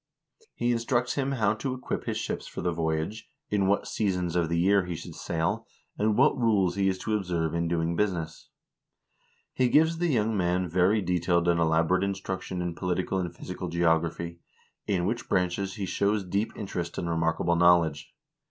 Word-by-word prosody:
He 120 - 0
instructs 120 +1 0
him 140 -1 -1
how 110 -5 +2
to 130 +4 -3
equip 130 - -4
his - - -2
ships - - -4
for - - -6
the 90 - 0
voyage, 80 +5 -2 0.2
in 100 -2 +2
what 100 +1 +1
seasons 90 -5 -1
of 85 -2 +1
the 85 - 0
year 95 +2 +3
he 90 - -3
should 85 - -8
sail, 80 -1 -2 0.3
and 105 0 +1
what - - +5
rules 105 -8 +2
he 100 +1 +1
is 95 - -1
to 110 - 0
observe 85 -5 -1
in 85 0 0
doing 85 0 0
business. 85 -6 -2 1.0
He 130 -1 +2
gives 160 +4 +4
the 175 - +1
young 110 -7 +1
man 90 -1 +1
very 95 +5 +2
detailed 85 -1 +1
and 85 -1 +3
elaborate 80 +3 +2
instruction 95 -2 -3
in 90 -1 -3
political 90 +2 -1
and 90 -2 -2
physical 90 +1 -6
geography, 85 0 0 0.5
in 90 -4 +1
which 115 +5 -2
branches 95 +1 0
he 100 - -3
shows 100 +2 0
deep 100 +5 -1
interest 90 -5 -4
and 85 - -2
remarkable 80 +1 +1
knowledge. 85 -4 +3
90 Hz, 180 wpm, -27 LUFS, 85-105 Hz, 1.0 s, what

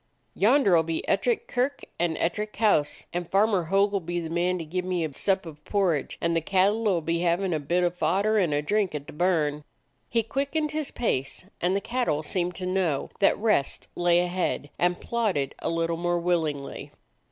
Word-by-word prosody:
"Yonder 215 -3 +4
'll 165 - +5
be 160 0 -3
Ettrick 470 -1 +1
Kirk 255 +3 -1 0.2
and 170 -2 0
Ettrick 210 +5 -2
House; 205 -9 +1
and 175 -1 -3
Farmer 200 -2 +2
Hogg 195 +4 +2
'll 200 - +2
be 175 0 -3
the 165 -1 -5
man 175 +2 +1
to 165 - -5
give 180 +4 -3
me 180 -2 -1
a 150 - -6
sup 190 +4 0
of 150 -2 -11
porridge, 185 -8 0
and 170 0 0
the 165 - +2
cattle 195 +6 +2
'll 175 -4 +1
be 165 +2 -1
having 175 +2 +1
a 155 - 0
bit 175 +5 0
of 175 -1 +1
fodder 195 +6 +2
and 175 -6 +1
a 145 0 0
drink 200 0 0
at 145 -1 -5
the - - -10
burn." 150 -3 +1 0.5
He 230 -1 +1
quickened 280 +6 -1
his 310 -2 -2
pace, 135 - -2 0.2
and 180 +2 +2
the 200 - 0
cattle 230 -10 -1
seemed 180 +2 -2
to 185 - -5
know 180 -6 0
that 195 - +4
rest 210 -10 0
lay 175 0 +3
ahead 175 -5 -2
and 175 0 +1
plod 230 -4 -1
ded 140 -1 -1
a - - -2
little 165 0 0
more 175 +1 0
willingly. 160 -5 -2
175 Hz, 205 wpm, -26 LUFS, 165-200 Hz, 0.5 s, ll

